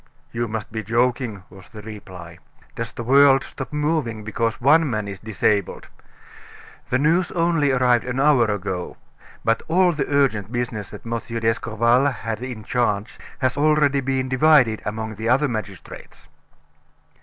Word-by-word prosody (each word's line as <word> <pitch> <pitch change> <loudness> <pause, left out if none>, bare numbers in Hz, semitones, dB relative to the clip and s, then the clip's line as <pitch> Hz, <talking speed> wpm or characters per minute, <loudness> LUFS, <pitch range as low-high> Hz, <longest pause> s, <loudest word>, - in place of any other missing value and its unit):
"You 120 0 -2
must 110 -1 -5
be 110 0 -3
joking," 115 -2 -1
was 95 0 -15
the 105 -2 -11
reply. 90 -6 -10 0.4
"Does 115 0 -5
the 120 - -7
world 135 +2 +5
stop 135 - -8
moving 150 -7 -1
because 115 +1 -2
one 150 +4 +4
man 110 -3 -2
is 100 -1 -7
disabled? 105 -2 -1 1.0
The 130 - +2
news 165 +6 +2
only 165 -5 +2
arrived 125 -2 +2
an 125 +1 -3
hour 135 -4 +4
ago; 95 -3 -4 0.5
but 115 0 +2
all 180 +2 +3
the 145 -3 -2
urgent 125 -8 +1
business 120 -5 -3
that - - -11
M. 115 0 -2
d'Escorval 115 +2 +1
had 115 -4 -4
in 125 -4 -6
charge 110 -3 -1 0.2
has 130 -2 0
already 145 -2 +3
been 130 0 -1
divided 130 -4 +4
among 110 +1 -4
the 110 +1 -2
other 135 +4 +3
magistrates." 110 -6 -8
120 Hz, 150 wpm, -22 LUFS, 110-140 Hz, 1.0 s, world